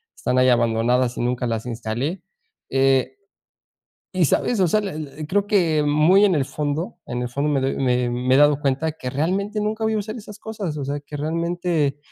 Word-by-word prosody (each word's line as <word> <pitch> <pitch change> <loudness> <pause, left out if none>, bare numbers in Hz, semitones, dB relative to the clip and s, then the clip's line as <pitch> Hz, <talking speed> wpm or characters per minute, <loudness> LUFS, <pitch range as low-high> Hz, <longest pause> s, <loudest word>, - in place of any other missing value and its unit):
están 125 - -1
ahí 130 0 +5
abandonadas 120 +1 +2
y - - -2
nunca 125 0 -1
las 115 -1 -2
instalé". 120 - -3 0.5
Eh, 135 - +2 1.0
¿y 185 -2 +3
sabes?, 215 - +1
o 185 - +4
sea, 215 +6 +2
e 155 -7 -6
e - - -4
creo 200 +5 +1
que 170 -7 +2
muy 155 +7 +4
en 195 -3 +4
el 145 -4 +1
fondo, 150 +5 -3
en 125 0 -3
el 125 - -2
fondo 140 +5 -1
me 140 -2 +1
doy 135 +1 -1
me 125 -2 +1
me 125 +2 +1
he - - +5
dado 145 -1 +5
cuenta 145 +3 0
que 130 -5 -6
realmente 190 +10 -1
nunca 215 +1 -2
voy 220 - +1
a - - +1
usar 215 +2 -5
esas 210 -2 -10
cosas, 210 -8 -5
o 140 - -3
sea, 145 +1 -3
que 145 +1 -8
realmente, 165 -2 -1
150 Hz, 210 wpm, -22 LUFS, 130-185 Hz, 1.0 s, ahí